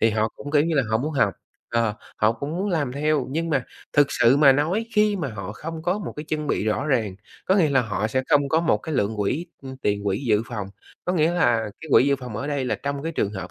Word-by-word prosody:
Thì 115 - +4
họ 110 0 +1
cũng, 145 - -7
kiểu 145 -1 +4
như 165 0 0
là, 135 - +4
họ 110 - +2
muốn 150 +6 -2
học, 110 -9 +2 0.4
ờ, 115 -2 +1 0.2
họ 110 +1 +3
cũng 140 +5 -5
muốn 195 +3 -1
làm 145 -8 0
theo, 145 0 0
nhưng 165 +4 -2
mà 135 -4 +1 0.3
thực 145 -1 +5
sự 120 +4 +4
mà 145 -2 +7
nói 165 +11 0
khi 210 -1 +3
mà 160 -7 -2
họ 100 -4 -6
không 160 +8 -7
có 180 +4 0
một 210 - -5
cái 150 - -5
chân 150 -1 -2
bị - - 0
rõ 110 +6 0
ràng, 110 -10 0 0.3
có 190 - +4
nghĩa 160 -6 +3
là 135 -1 +4
họ 110 -1 -2
sẽ 130 +4 0
không 140 -1 +3
có 160 +3 +3
một 165 - +2
cái 160 - -5
lượng 110 -3 0
quỹ, 120 - -1 0.2
ừm, 130 0 -8
tiền 105 -5 -1
quỹ 100 +6 -1
dự 105 -2 +3
phòng. 105 -6 -4 0.4
Có 180 - 0
nghĩa 165 -1 +2
là 120 -11 +2
cái 160 - -9
quỹ - - +7
dự 140 - +3
phòng 125 -5 -7
ở 140 - -4
đây 145 -2 -1
là 125 - 0
trong 140 0 -4
cái 165 +1 -3
trường 100 -8 -1
hợp 95 -3 -6
140 Hz, 275 wpm, -24 LUFS, 110-155 Hz, 0.4 s, mà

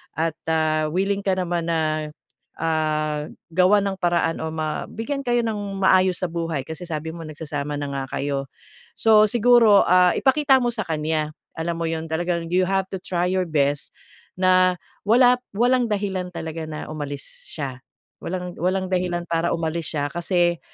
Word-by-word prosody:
at, 160 0 -1
ah, 155 -1 +1
willing 195 +4 0
ka 190 -1 +2
naman 175 -2 -2
na, 155 -2 0 0.5
ah, 155 -2 0 0.2
gawan 185 +4 +4
ng 190 - -5
paraan 170 -2 +1
o - - -2
mabigyan 225 - -3
kayo 240 -1 +2
nang 220 -2 -2 0.2
maayos 185 -1 +4
sa - - +2
buhay 165 -4 -2
kasi 160 +5 -7
sabi 160 0 -4
mo 165 -1 -8
nagsasama 150 -1 -4
na 145 -1 -4
nga 135 -1 -3 0.2
kayo. 140 -1 -2 0.5
So, 215 -1 +6
siguro, 230 -2 +5
ah, 180 0 +5
ipakita 270 -1 +4
mo 240 - +1
sa 220 -3 -2
kanya 155 -1 -1 0.2
alam 170 +1 -3
mo 165 - 0
yun, 160 0 -3
talagang 170 0 -1
you 185 +1 +3
have 195 0 +1
to 190 - -4
try 180 -1 -1
your 185 -2 0
best 145 -2 0 0.4
na 185 0 +4 0.3
wala 245 +2 +6 0.2
walang 245 +2 +3
dahilan 195 -3 -1
talaga 160 -1 -5
na 155 -1 -6
umalis 145 -2 -7
siya 135 -4 -5 0.4
walang 180 0 -4
walang 185 +2 0
dahilan 180 -1 0
para 165 0 +1
umalis 165 0 -3
siya 145 -2 -1
kasi, 175 -1 +1
170 Hz, 160 wpm, -23 LUFS, 155-190 Hz, 0.5 s, So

